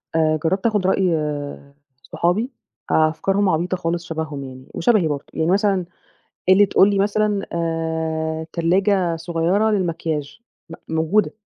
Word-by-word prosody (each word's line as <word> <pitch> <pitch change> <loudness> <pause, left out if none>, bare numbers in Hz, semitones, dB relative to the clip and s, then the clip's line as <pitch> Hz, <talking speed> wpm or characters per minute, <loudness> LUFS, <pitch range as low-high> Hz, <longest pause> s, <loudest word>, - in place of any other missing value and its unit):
آآ 155 -1 +3
جربت 190 +6 0
آخد 205 -4 +1
رأي 190 -2 +2 0.9
صحابي، 210 +10 -1 0.4
أفكارهم 175 +6 +2
عبيطة 175 +3 0
خالص 170 0 -2
شبههم 155 -4 -4
يعني، 130 0 -10
وشبهي 205 -4 +2
برضه، 145 -2 -3
يعني 160 +3 0
مثلًا 195 -2 +2 0.6
اللي 200 +2 +6
تقول 195 +1 +4
لي 200 - 0
مثلًا 205 0 +1
آآ 160 -1 -2
تلاجة 180 0 +1
صغيّرة 170 +6 +1
للمكياج، 165 -4 -2 0.3
م - - -7 0.2
موجودة، 160 +7 +2
170 Hz, 125 wpm, -21 LUFS, 160-195 Hz, 0.9 s, اللي